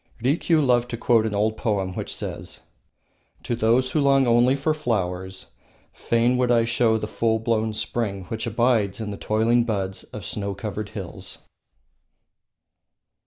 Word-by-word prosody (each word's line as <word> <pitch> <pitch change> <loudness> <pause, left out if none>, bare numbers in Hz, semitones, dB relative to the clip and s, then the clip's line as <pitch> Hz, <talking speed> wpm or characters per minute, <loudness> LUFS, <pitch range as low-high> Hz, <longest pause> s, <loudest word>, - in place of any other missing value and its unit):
Rikiu 150 +5 +2
loved 120 -1 +2
to 115 - -4
quote 115 -2 +3
an 105 - -3
old 110 +2 +1
poem 100 -5 -1
which - - -5
says: - - -5 0.8
"To 120 - -1
those 120 +3 +2
who 155 - +1
long 135 -1 +4
only 120 +2 +4
for 145 +3 0
flowers, 95 -9 -3 0.4
fain 120 +2 +1
would 125 -1 +1
I 115 -1 +4
show 115 -1 +2
the 105 - -3
full 110 0 0
blown 110 -1 0
spring 105 -3 -2
which 110 +5 -4
abides 115 -4 +1
in 110 -2 -4
the - - -4
toiling 115 +3 +2
buds 95 -4 -3
of - - -9
snow 100 -1 -3
covered 105 +1 -5
hills." 95 -5 -7
115 Hz, 155 wpm, -24 LUFS, 105-120 Hz, 0.8 s, long